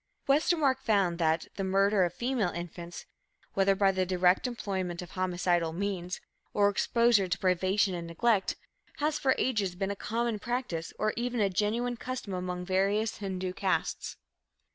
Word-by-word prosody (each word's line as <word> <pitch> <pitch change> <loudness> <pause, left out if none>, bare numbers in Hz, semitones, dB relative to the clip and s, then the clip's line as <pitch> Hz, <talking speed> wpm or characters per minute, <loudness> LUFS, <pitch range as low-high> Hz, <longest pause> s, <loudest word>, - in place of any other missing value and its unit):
Westermark 280 -1 +3
found 195 -7 +1
that 160 -1 +2
"the 195 - -1
murder 195 +1 +3
of 175 - +1
female 240 -3 0
infants, 170 0 -7 0.5
whether 195 0 +3
by 195 0 +4
the 190 -1 0
direct 180 +3 +3
employment 190 -7 -3
of 175 - -12
homicidal 175 -3 0
means, 185 -1 -3 0.4
or 205 -1 +5
exposure 230 0 +3
to 180 +1 -1
privation 190 +1 +2
and 170 -1 -4
neglect, 200 +4 +1 0.4
has 300 0 0
for 265 -1 +3
ages 205 -8 0
been 195 +2 -2
a - - -3
common 230 +2 -2
practice 240 -9 -3
or 215 0 0
even 245 +1 -2
a 200 -2 +2
genuine 235 +5 0
custom 250 -5 -5
among 180 0 -3
various 200 +4 +1
Hindu 185 -2 -3
castes." 190 0 -1
195 Hz, 155 wpm, -30 LUFS, 180-230 Hz, 0.5 s, or